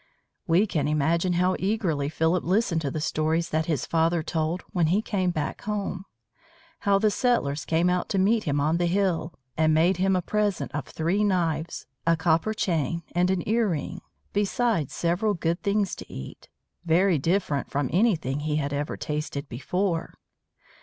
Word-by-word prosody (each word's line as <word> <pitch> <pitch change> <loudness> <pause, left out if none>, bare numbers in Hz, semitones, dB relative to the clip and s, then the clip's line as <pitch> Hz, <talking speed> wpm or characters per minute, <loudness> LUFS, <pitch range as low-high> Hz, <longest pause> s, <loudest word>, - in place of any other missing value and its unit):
We 175 +5 +4
can 155 -8 -1
imagine 165 +4 +1
how 180 +2 +2
eagerly 185 -8 0
Philip 160 +3 +1
listened 180 -2 +1
to 145 - -1
the 155 - -3
story 155 +1 0
that 160 -1 -2
his 155 -4 0
father 165 0 +1
told 160 +2 -2
when 175 -3 +2
he 185 +6 +3
came 195 -4 0
back 155 -4 -3
home: 200 -2 -3 0.7
how 200 -2 +3
the 210 +1 +2
settlers 160 - 0
came 165 +2 +2
out 180 0 0
to 195 - 0
meet 215 +4 +2
him 145 -2 +1
on 155 +3 +2
the 175 0 +1
hill, 180 -3 0 0.2
and 155 0 +3
made 170 +4 +3
him 190 +1 +2
a 180 - 0
present 210 0 -1
of 150 -1 -3
three 175 +6 0
knives, 170 -5 0 0.2
a 165 0 +4
copper 165 +6 +1
chain, 170 -4 -1
and 175 +2 +2
an 185 -2 -1
ear 225 0 +2
ring, 175 +3 -3 0.3
besides 205 - +1
several 180 +5 0
good 170 +1 -1
things 200 -1 0
to - - -10
eat, 65 - -9 0.3
very 175 0 +3
different 165 -2 0
from 140 -1 -1
anything 165 - +2
he 150 0 -1
had 145 -1 -1
ever 145 +1 -2
tasted 150 -1 -4
before. 165 +7 -2
170 Hz, 175 wpm, -26 LUFS, 155-195 Hz, 0.7 s, We